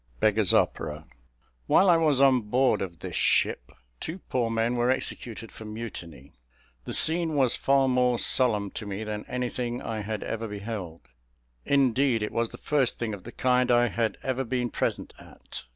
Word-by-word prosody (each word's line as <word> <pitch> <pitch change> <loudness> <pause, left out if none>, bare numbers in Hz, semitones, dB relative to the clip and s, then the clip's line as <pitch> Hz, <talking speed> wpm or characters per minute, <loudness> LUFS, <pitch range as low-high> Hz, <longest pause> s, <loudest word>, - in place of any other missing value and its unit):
"Beggar's 110 -2 +3
Opera." 75 +1 0 0.6
While 195 - +5
I 175 - +7
was 155 -5 +2
on 135 -2 +5
board 125 +5 +2
of 85 -4 -6
this - - -6
ship - - +1 0.3
two 160 - -4
poor 125 -10 -2
men 115 +2 0
were 120 +1 +1
executed 115 -3 -3
for - - -11
mutiny. 90 - -8 0.5
The - - -5
scene 165 -1 +2
was 130 -4 +3
far 135 -1 +3
more 125 -1 +2
solemn 105 -6 +1
to 110 - -6
me 100 +2 -4
than 105 -1 -5
anything 125 -1 -3
I 110 -1 -4
had 105 0 -4
ever 115 0 -4
beheld. 100 -5 -6 0.6
Indeed 130 -3 +2
it 105 - -3
was 115 0 0
the - - -11
first 140 -5 +1
thing 115 -2 -3
of 100 -3 -9
the 120 - -8
kind 125 0 +2
I 120 0 +4
had 115 -1 -1
ever 130 0 -1
been 125 -1 -2
present - - -2
at. - - -9
120 Hz, 175 wpm, -27 LUFS, 105-130 Hz, 0.6 s, I